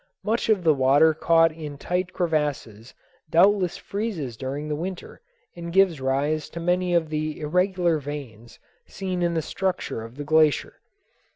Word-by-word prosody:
Much 225 +2 -1
of 205 -5 +3
the 160 -2 +5
water 140 +4 +4
caught 165 +1 +3
in 155 -2 -8
tight 180 +5 -2
crevasses 145 - -2 0.3
doubtless 185 +2 +3
freezes 195 - -4
during 135 +5 -5
the 150 - -2
winter 180 +4 -6 0.3
and 170 0 -7
gives 180 -5 +3
rise 140 +4 -1
to 170 - -7
many 180 +1 +1
of 165 -2 +1
the 155 0 -3
irregular 175 +1 +1
veins 125 -6 -8 0.3
seen 185 -2 -4
in 170 -1 0
the 160 - 0
structure 185 -11 -3
of 115 +2 -10
the 145 - -6
glacier. 155 -1 +2
160 Hz, 155 wpm, -24 LUFS, 145-180 Hz, 0.3 s, the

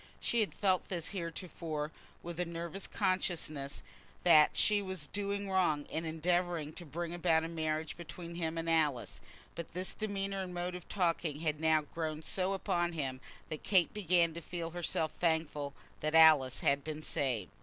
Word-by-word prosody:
She 235 - +1
had 215 - 0
felt 190 -3 +2
this 175 -4 -2
heretofore, 165 -4 -4 0.3
with 170 0 -6
a 180 - +1
nervous 170 +3 -5
consciousness 170 -7 -1 0.4
that 155 -4 +6
she 210 -1 +4
was 190 -6 -4
doing 200 +2 -3
wrong 175 -6 +2
in 160 - -2
endeavouring 165 -1 0
to 175 - -8
bring 170 +3 -4
about 165 -2 +3
a - - -2
marriage 160 -1 -2
between 170 0 -8
him 165 -1 -2
and 165 0 -2
Alice; 155 -6 +1 0.3
but 170 0 -7
this 185 +1 -2
demeanour 195 -2 -2
and 180 -1 -5
mode 175 +1 -2
of 180 -1 -8
talking 165 -5 0
had 155 -2 0
now 160 -1 +4
so 145 - -16
grown 155 -2 -2 0.3
upon 175 -3 0
him 135 -5 -3 0.3
that 155 - -4
Kate 185 -5 +3
began 175 -5 +3
to 170 - -6
feel 170 -1 -4
herself 165 -2 -1
thankful 160 -4 0 0.2
that 155 +1 0
Alice 155 -5 +7
had 140 0 +3
been 155 0 -5
saved. 130 - -1
165 Hz, 170 wpm, -33 LUFS, 155-180 Hz, 0.4 s, Alice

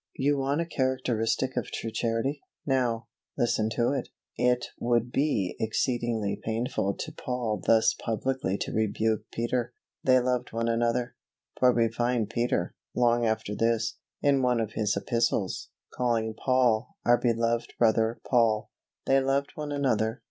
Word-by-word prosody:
You 140 +1 +1
want 140 +4 0
a - - -1
characteristic 130 -4 0
of 125 - -1
true 115 - -4
Charity. 115 +6 -1 0.2
Now, 125 -4 +1 0.3
listen 110 -2 +1
to 120 +1 +2
it. 135 -3 -2 0.3
It 125 0 +2
would 120 0 +1
be 135 -11 0
exceedingly 110 -2 -1
painful 110 -3 -1
to - - -5
Paul 120 -4 -3
thus 110 -1 +4
publicly 115 -3 -2
to - - -3
rebuke 110 0 0
Peter. 120 +1 -1 0.3
They 130 -1 +5
loved 125 -1 -1
one 115 0 -1
another, 120 +1 0 0.5
for 125 0 +6
we 115 -1 +3
find 120 -1 0
Peter, 115 -5 -1 0.2
long 120 -1 +3
after 110 -1 -1
this, 115 +1 0 0.3
in 140 -2 +4
one 125 -2 +2
of 110 -2 -2
his 105 -1 0
Epistles, 115 -5 0 0.2
calling 115 -3 0
Paul 125 -1 +1
"our 120 0 +5
beloved 115 0 0
brother, 115 0 +2
Paul." 115 -4 +2 0.3
They 135 0 +4
loved 135 +1 0
one 150 -1 -5
another. 120 -5 0
120 Hz, 145 wpm, -28 LUFS, 110-125 Hz, 0.5 s, for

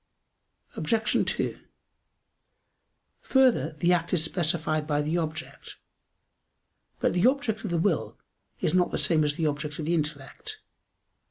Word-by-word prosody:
Obj. 215 +7 +1
2: - - -2 1.6
Further, 245 - +3
the 175 +2 +3
act 170 -1 0
is 160 - +2
specified 160 -2 0
by 145 -1 +1
the 160 +4 0
object. 160 -1 -6 1.2
But - - +1
the 180 +6 +4
object 255 -5 0
of 210 - -3
the 170 - 0
will 165 -1 0 0.4
is - - +1
not 180 -1 +3
the - - -2
same 160 -3 +3
as 145 -1 0
the 160 - -1
object 150 0 -2
of 155 - -4
the 165 - 0
intellect. 155 - -3
165 Hz, 140 wpm, -27 LUFS, 155-185 Hz, 1.6 s, the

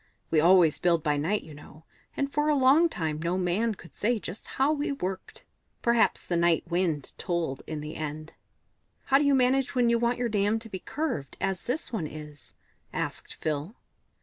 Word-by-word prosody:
We 160 - +4
always 170 -1 +5
build 170 -3 +2
by 150 -2 +1
night, 180 +9 0
you 155 - -11
know, 150 +2 -14 0.3
and 280 0 -1
for 295 +1 +1
a 300 - +4
long 280 +5 +5
time 155 - -3
no 170 +2 0
man 195 +5 0
could 175 - -15
say 235 +3 +1
just 200 -1 -7
how 275 +3 +3
we 290 -1 -1
worked. 190 -9 -5 0.4
Perhaps 235 -1 +2
the 175 - -1
Night 170 -1 +3
Wind 170 -5 -1
told 170 -6 -2
in 155 -1 -4
the 150 +1 -7
end." 155 0 -5 0.7
"How 270 - +4
do - - +2
you 285 -1 +4
manage 265 +1 +2
when 245 -2 +3
you 235 - +3
want 235 +1 +1
your 245 0 0
dam 210 0 +1
to 225 0 -9
be 190 - -5
curved, 260 - -4
as 190 -2 -2
this 255 +2 -3
one 170 -9 -1
is?" 150 -5 -11 0.4
asked - - -4
Phil. 155 - -3
185 Hz, 195 wpm, -28 LUFS, 160-245 Hz, 0.7 s, always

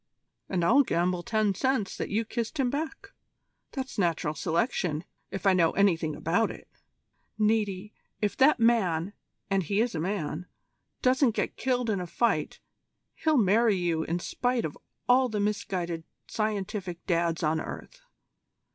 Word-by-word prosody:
"And 175 -3 0
I'll 260 +9 +6
gamble 180 -6 0
ten 215 +1 +1
cents 260 -1 0
that - - -3
you 220 +3 0
kissed 235 +6 -4
him 250 -2 +2
back. 315 +7 -4 0.6
That's 265 -4 -4
Natural 165 -4 +1
Selection, 165 - -1 0.3
if 195 0 -6
I 195 - +6
know 170 -3 +3
anything 165 -6 +2
about 165 +9 +1
it. - - -10 0.7
Niti, 210 -2 0 0.3
if 210 -2 0
that 270 +1 +5
man 205 -6 +2 0.4
and 195 -1 +3
he 200 +4 -1
is 235 +1 +1
a 160 - -2
man 175 -1 -3 0.6
doesn't 255 -2 +3
get - - -1
killed 250 -2 0
in 210 -3 0
a 180 - -5
fight, 230 +7 0 0.5
he'll 315 -2 +1
marry 220 0 +4
you 170 -3 0
in 165 +2 -1
spite 245 +6 -1
of 150 - -5 0.3
all 255 +1 +5
the 215 -2 -2
misguided 185 -5 -2 0.2
scientific 200 -4 -3
Dads 170 -1 0
on 160 +1 +1
earth. - - -8
200 Hz, 150 wpm, -28 LUFS, 175-235 Hz, 0.7 s, I'll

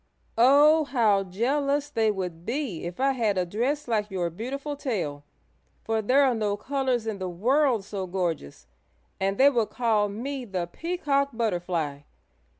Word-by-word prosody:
"Oh, 295 +5 +6
how 220 -8 +2
jealous 280 +9 0
they 225 -5 +2
would 180 -5 -4
be 235 - -3
if 175 +5 -6
I 275 +1 +3
had 225 -7 0
a 180 - +1
dress 250 +11 -2
like 215 -3 0
your 180 -3 -2
beautiful 275 - -5
tail, 180 - -3 0.6
for 225 0 0
there 255 +7 +4
are 265 -2 +3
no 210 -3 -1
colors 260 -1 -1
in 215 -3 -3
the 185 -1 -3
world 240 - +2
so 195 -2 -4
gorgeous, 165 - -3 0.5
and 195 +1 0
they 280 +2 +6
would 230 -5 0
call 220 -4 +1
me 260 +6 -4
the 190 -6 -3
Peacock 285 - -1
Butterfly! 175 -10 -2
225 Hz, 155 wpm, -26 LUFS, 190-275 Hz, 0.6 s, Oh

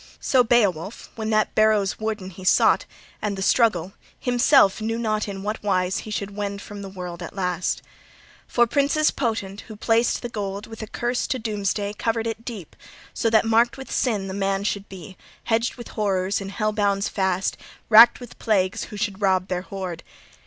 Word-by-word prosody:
So 255 -2 +3
Beowulf, 205 -5 +1
when 220 -1 -3
that 215 -1 +2
barrow's 215 -3 +2
warden 215 -3 -3
he 185 +1 -11
sought, 185 - +4 0.4
and 205 -2 -2
the 190 - -2
struggle; 195 -5 +2 0.3
himself 245 -4 +4
knew 225 +1 -1
not 215 -2 -1
in 195 -1 -6
what 210 +2 -3
wise 185 -2 0
he - - -8
should 200 -1 -4
wend 200 -1 -3
from 205 0 -9
the 195 - -7
world 180 -2 -7
at 170 - -8
last. 180 -2 -1 0.6
For 240 - +3
{40c} 235 - -15
princes 290 +2 +3
potent, 220 -6 -3
who 220 - -9
placed 225 +4 +1
the - - -2
gold, 200 -3 -4
with 225 0 -10
a 220 - -5
curse 240 +3 -2
to 260 - -1
doomsday 205 -2 -2
covered 225 0 0
it 225 0 -4
deep, 215 - -8 0.4
so 225 - 0
that 220 0 +4
marked 230 +3 +3
with 265 - -9
sin 210 -6 0
the 190 - -5
man 195 0 -1
should 200 -1 -2
be, 190 0 -10 0.3
hedged 230 +1 0
with 240 - -9
horrors, 195 -2 0
in 195 - -5
hell 215 +2 -1
bonds 200 -2 +1
fast, 190 -1 0 0.3
racked 230 +2 +8
with 245 -2 -12
plagues, 190 -4 +1
who 210 - -9
should 205 -1 -3
rob 190 -1 +2
their 180 -1 -1
hoard. 185 -3 -6
205 Hz, 190 wpm, -23 LUFS, 195-225 Hz, 0.6 s, racked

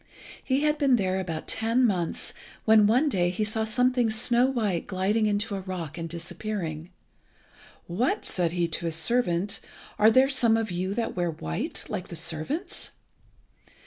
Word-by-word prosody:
He 265 +1 +1
had 300 0 +1
been 275 -4 +4
there 190 -4 0
about 165 -4 -4
ten 230 +3 +2
months 180 -7 -1 0.3
when 220 -2 +6
one 250 +8 +3
day 180 -10 +1
he 190 +4 -2
saw 220 +1 -1
something 250 +1 +2
snow 235 +3 +3
white 215 -10 -1
gliding 205 +4 +1
into 205 +1 -1
a 195 - -2
rock 180 -5 -6
and 165 -1 -5
disappearing. 170 -1 -5 1.0
"What!" 245 - -1
said 170 -3 -1
he 175 -1 +1
to 170 +1 -3
his 165 - -1
servant, 185 +1 +1 0.4
"are 215 - +7
there 260 +4 +5
some 240 -5 +4
of 220 -3 -2
you 185 +3 -2
that 230 0 -2
wear 175 -1 0
white 80 - -4
like 180 - -4
the 170 - -8
servants?" 170 - -3
205 Hz, 165 wpm, -26 LUFS, 175-235 Hz, 1.0 s, are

